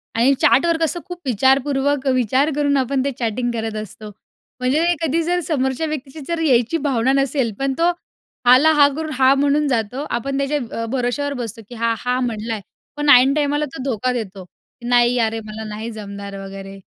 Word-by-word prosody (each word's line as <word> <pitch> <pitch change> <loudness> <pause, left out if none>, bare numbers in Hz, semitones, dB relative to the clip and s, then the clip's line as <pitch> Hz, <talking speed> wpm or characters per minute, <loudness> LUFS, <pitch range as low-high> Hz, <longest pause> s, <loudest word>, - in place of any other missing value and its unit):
आणि 245 +5 +4
चॅटवर 335 +3 +4
कसं 330 +2 0
खूप 355 -1 -7
विचारपूर्वक 270 +3 +1
विचार 255 +4 +2
करून 285 -1 +1
आपण 265 0 0
ते 280 - 0
चॅटिंग 240 +1 -1
करत 225 -1 -3
असतो, 215 +1 -10 0.5
म्हणजे 275 +7 +1 0.2
कधी 325 +3 +1
जर 355 +2 0
समोरच्या 265 0 -1
व्यक्तीची 300 0 -6
जर 335 -1 -2
यायची 250 -1 +2
भावना 255 0 +1
नसेल 275 -3 +1
पण 270 0 0
तो 340 +1 +4 0.6
हां 250 +1 +9
ला 315 +1 +5
हां 285 -1 +6
करून 315 -1 -4
हां 265 +1 +4
म्हणून 290 +1 +2
जातो, 250 +2 -1
आपण 270 +4 -2
त्याच्या 280 +2 0 0.2
अ, 230 - -2
भरोश्यावर 270 +3 -1
बसतो 225 0 -7
की 245 - -9
हा 230 0 0
हां 250 +1 -1
म्हणला 225 -1 -3
आहे, 215 - -4 0.4
पण 295 0 0
ऐन 265 +1 +7
टाईमाला 295 0 0
तो 265 - -6
धोका 255 -1 -1
देतो 200 -5 -5
की 240 +6 -15
"नाही 245 0 +3
अरे 225 -1 0
मला 215 +1 -7
नाही 215 +2 -5
जमणार" 200 -2 -8
वगैरे 195 0 -9
260 Hz, 190 wpm, -20 LUFS, 230-285 Hz, 0.6 s, हां